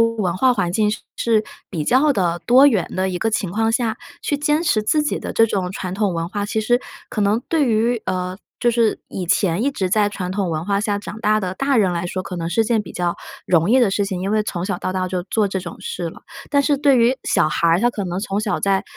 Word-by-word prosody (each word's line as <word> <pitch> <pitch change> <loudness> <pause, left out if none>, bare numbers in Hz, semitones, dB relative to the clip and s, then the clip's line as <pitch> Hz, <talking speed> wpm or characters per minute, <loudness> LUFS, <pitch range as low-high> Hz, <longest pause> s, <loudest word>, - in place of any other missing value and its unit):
文 220 -6 +1
化 255 +6 +4
环 195 -7 -1
境 210 +2 +2 0.3
是 220 -2 +2 0.3
比 160 -6 -3
较 270 - +4
的 175 -6 0
多 260 +4 +7
元 215 - +2
的 190 +1 +1
一 180 -1 -3
个 225 - 0
情 200 -4 -1
况 225 +2 +1
下， 225 -1 0 0.2
去 290 - -1
坚 300 +2 +1
持 235 -11 +1
自 300 +8 +2
己 295 - -1
的 - - -5
这 225 - +4
种 190 -4 -2
传 185 -1 -5
统 200 -1 0
文 165 0 -3
化， 205 +1 -3
其 220 +1 -1
实 240 +3 +2 0.3
可 215 - -3
能 205 +3 +2
对 320 -3 +2
于， 230 +1 +1
呃， 185 0 -2 0.2
就 240 - +1
是 230 -2 +1
以 185 - -4
前 185 +1 +1
一 280 - +2
直 190 -9 -2
在 205 +2 +2
传 190 -3 -5
统 190 -2 -1
文 160 0 -2
化 200 -1 +1
下 205 -1 -1
长 210 +1 -8
大 215 0 +2
的 185 -3 -3
大 275 +4 +1
人 195 -5 +3
来 170 0 -2
说， 185 +2 -3
可 185 - -7
能 165 -1 -3
是 225 +6 +2
件 225 -1 +1
比 185 - -11
较 175 -1 -1 0.3
容 170 +2 +3
易 255 - +5
的 240 -6 +4
事 200 - +1
情， 190 -2 -3
因 195 +2 -2
为 215 0 +2
从 180 -3 -4
小 195 -2 -1
到 185 - -3
大 185 0 -1
就 180 -1 -2
做 215 +1 +1
这 190 -1 -3
种 175 -1 -8
事 470 0 -4
了。 - - -15 0.3
但 285 - +4
是 285 +1 +2
对 275 -2 +4
于 240 +3 +3
小 - - +2
孩 170 +2 +1
儿， 165 +2 +3
他 240 - +4
可 205 -4 -4
能 180 0 -3
从 200 0 -2
小 215 -1 -1
在 195 -1 +1
205 Hz, 285 characters per minute, -20 LUFS, 185-230 Hz, 0.3 s, 多